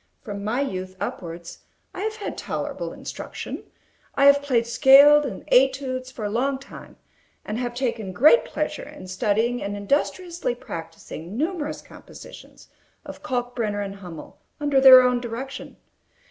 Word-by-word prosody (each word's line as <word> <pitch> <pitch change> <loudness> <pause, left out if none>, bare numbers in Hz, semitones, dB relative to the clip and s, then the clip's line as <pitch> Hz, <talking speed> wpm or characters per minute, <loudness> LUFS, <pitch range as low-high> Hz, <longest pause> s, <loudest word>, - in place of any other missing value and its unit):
From 200 -4 -6
my 225 +6 -1
youth 185 -7 -4
upwards, 170 -1 -6 0.3
I 370 - -6
have 435 +1 -2
had 420 - -6
tolerable - - -4
instruction. - - -7 0.5
I 275 - +3
have 280 0 +7
played 250 -5 +1
scales 285 +4 +7
and 200 -7 -8
études 260 0 +2
for 230 -4 -6
a - - -1
long 265 +5 0
time; 270 +1 -13 0.5
and 215 +2 -4
have 240 -1 -3
taken 235 -6 -2
great 295 - +5
pleasure - - -4
in 185 - -11
studying 220 +5 0
and 200 +1 -4
industriously 295 - -1
practising 165 0 -8
numerous 310 0 -3
compositions - - -14 0.4
of - - -10
Kalkbrenner 240 -5 -2
and 195 0 -8
Hummel, 175 -5 -11 0.2
under 290 -2 +2
their 260 -1 +10
own 250 -1 +1
direction. 245 +3 -7
245 Hz, 145 wpm, -24 LUFS, 205-275 Hz, 0.5 s, their